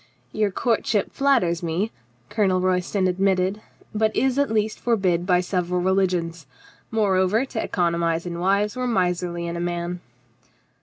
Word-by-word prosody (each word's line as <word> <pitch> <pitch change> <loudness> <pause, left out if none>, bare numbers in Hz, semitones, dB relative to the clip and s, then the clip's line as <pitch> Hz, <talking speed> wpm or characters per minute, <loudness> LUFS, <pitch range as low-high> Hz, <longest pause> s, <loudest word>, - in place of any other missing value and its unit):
"Your 215 -1 +1
courtship 220 0 0
flatters 250 -12 +2
me," 175 +6 -1 0.4
Colonel 190 -4 +2
Royston 185 +1 +1
ad 180 0 -2
mitted, 195 +1 +1 0.3
"but 215 0 +1
is 265 0 +1
at 285 - +2
least 215 0 0
forbid 190 -7 +1
by 180 -1 +4
several 180 -1 -1
religions. 175 -4 0 0.4
Moreover, 205 +1 +2
to 235 -4 -4
economize 170 -2 0
in 170 -1 -4
wives 200 +3 +1
were 255 0 -2
miserly 180 -5 0
in 170 0 -4
a - - -3
man." 175 0 -3
185 Hz, 145 wpm, -23 LUFS, 175-215 Hz, 0.4 s, by